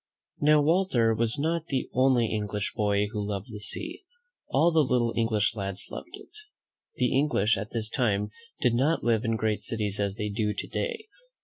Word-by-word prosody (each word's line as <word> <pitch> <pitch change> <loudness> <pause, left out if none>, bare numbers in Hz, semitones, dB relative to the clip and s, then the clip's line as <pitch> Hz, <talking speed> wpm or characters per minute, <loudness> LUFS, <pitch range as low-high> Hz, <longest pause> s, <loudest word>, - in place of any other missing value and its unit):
Now, 150 0 +5
Walter 150 -9 +3
was 115 +3 +2
not 165 +3 -1
the 135 -2 -1
only 130 -2 +3
English 105 -1 -3
boy 105 -1 +1
who 105 -2 -3
loved 100 +1 -4
the 105 - -6
sea. 330 - -2 0.4
All 170 - +3
the 160 -2 +4
little 120 -3 +1
English 115 -2 +1
lads 100 -2 -5
loved 345 +3 -8
it. 415 - -16 0.6
The 125 0 +1
English 115 -7 +2
at 105 +2 -5
this 110 -2 -1
time 105 -4 0 0.3
did 125 -3 +3
not 140 +7 +1
live 115 -1 +2
in 115 -2 0
great 110 -1 -1
cities 105 -3 -1
as 100 -1 -1
they 105 -1 -3
do 105 0 -1
to - - -4
day. 460 -3 -3
115 Hz, 185 wpm, -27 LUFS, 105-140 Hz, 0.6 s, Now